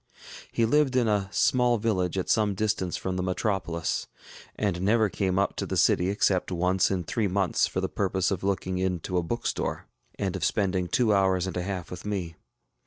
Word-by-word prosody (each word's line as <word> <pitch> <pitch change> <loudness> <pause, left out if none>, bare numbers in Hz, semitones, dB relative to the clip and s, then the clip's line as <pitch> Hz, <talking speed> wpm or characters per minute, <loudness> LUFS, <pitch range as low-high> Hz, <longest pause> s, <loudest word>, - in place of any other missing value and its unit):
ŌĆØ - - -16
He 115 - +2
lived 140 +1 +2
in 125 -3 +3
a 100 -3 +1
small 125 +1 +3
village 95 -5 0
at 95 - -1
some 105 -2 +2
distance 100 -3 -1
from 95 -1 -3
the - - 0
metropolis, 90 -3 -1 0.5
and 95 -4 -1
never 110 +2 +3
came 95 -1 -1
up 100 - +1
to - - -2
the - - -2
city 90 +2 +3
except 95 -2 +1
once 90 +1 +2
in 95 -2 -1
three 115 -2 -1
months 95 -3 +1
for - - -3
the - - 0
purpose 95 -1 0
of 95 -2 -2
looking 95 -1 -1
into 90 -1 -2
a - - +3
bookstore, 120 +8 -3 0.3
and - - -2
of - - -4
spending 95 -3 +1
two 110 +2 +2
hours 95 -2 +2
and 95 - -5
a 90 - -1
half 90 -1 -4
with 90 0 -7
me. 95 -6 -3
95 Hz, 200 wpm, -27 LUFS, 90-105 Hz, 0.5 s, in